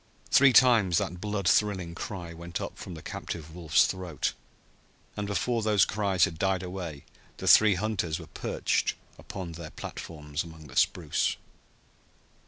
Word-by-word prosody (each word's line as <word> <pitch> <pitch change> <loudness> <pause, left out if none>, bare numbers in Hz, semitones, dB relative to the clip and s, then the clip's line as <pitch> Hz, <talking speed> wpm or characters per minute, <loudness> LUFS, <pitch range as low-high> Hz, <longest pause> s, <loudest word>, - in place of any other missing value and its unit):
Three 140 0 +7
times 110 -8 +5
that 90 0 -2
blood 105 -3 -2
thrilling 95 -5 +2
cry 85 -1 -6
went 85 0 -6
up - - -5
from 90 - -7
the 80 - -10
captive 80 -1 -6
wolf's 85 -3 +3
throat, 90 -6 -2 0.8
and 105 -1 -3
before 115 +5 0
those 105 -3 +4
cries 100 -5 +2
had 80 -1 -7
died 95 -1 +1
away 90 -5 -6 0.3
the - - -5
three 105 -2 +7
hunters 95 -5 -1
were 85 - -9
perched - - -1 0.2
upon 95 -4 -7
their 85 -1 -8
platforms 75 -1 -6
among 80 -2 -12
the 65 -4 -13
spruce. - - +1
90 Hz, 150 wpm, -28 LUFS, 85-100 Hz, 0.8 s, Three